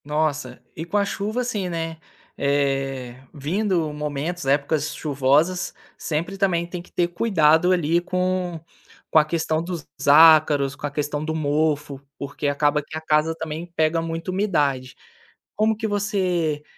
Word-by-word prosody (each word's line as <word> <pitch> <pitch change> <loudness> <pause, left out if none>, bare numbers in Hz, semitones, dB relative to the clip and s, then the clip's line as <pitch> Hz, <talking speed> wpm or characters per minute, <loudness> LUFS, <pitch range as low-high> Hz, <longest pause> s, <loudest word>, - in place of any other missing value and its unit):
Nossa, 150 0 -1 0.2
e 160 - -5
com 175 +5 -2
a 200 - +2
chuva 210 +4 -2
assim, 210 -7 -2
né, 165 -1 -4 0.4
eh, 135 -3 -1
vindo 165 +1 -1
momentos, 150 +3 -4
épocas 145 +2 +1
chuvosas, 150 +5 +1 0.2
sempre 170 +5 -3
também 175 -4 +1
tem 175 0 -6
que - - -18
ter 175 - +1
cuidado 175 -3 +3
ali 170 -1 +2
com 180 -1 -1 0.5
com 160 - +7
a 150 - +3
questão 160 0 -1
dos 170 -2 -5 0.2
ácaros, 150 -2 +6
com 145 0 -5
a - - -5
questão 150 0 -2
do 160 0 -2
mofo, 150 -2 0 0.2
porque 140 +1 -4
acaba 145 +1 +2
que 155 - -11
a - - -6
casa 155 +1 +1
também 160 +1 -5
pega 160 +1 +2
muita 165 +2 -4
umidade. 145 -10 0 0.6
Como 220 +1 +2
que 220 - -4
você, 185 -7 0
160 Hz, 150 wpm, -23 LUFS, 145-180 Hz, 0.6 s, com